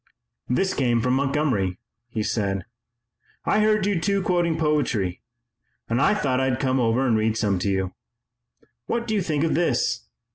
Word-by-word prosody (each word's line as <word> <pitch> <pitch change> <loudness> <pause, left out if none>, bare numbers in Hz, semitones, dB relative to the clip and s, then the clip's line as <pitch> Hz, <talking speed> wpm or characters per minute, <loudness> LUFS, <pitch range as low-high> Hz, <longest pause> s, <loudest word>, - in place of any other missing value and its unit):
"This 190 +10 +1
came 120 -3 +1
from 125 +2 +1
Montgomery," 135 -9 0 0.3
he 110 -2 -2
said. 100 -4 -1 0.8
"I 210 - +2
heard 215 -2 +3
you 200 -5 0
two 200 0 +1
quoting 175 -3 +1
poetry, 145 - 0 0.7
and 120 +3 0
I 210 - +4
thought 135 -10 0
I'd 130 -1 0
come 130 -1 +1
over 120 +2 +2
and 120 -3 +3
read 110 0 +1
some 100 -4 +1
to 100 - -1
you. 95 -1 -1 0.9
What 235 0 -1
do 220 - -2
you 205 - +2
think 155 -4 -1
of 165 - +1
this? 175 - 0
130 Hz, 170 wpm, -24 LUFS, 110-170 Hz, 0.9 s, I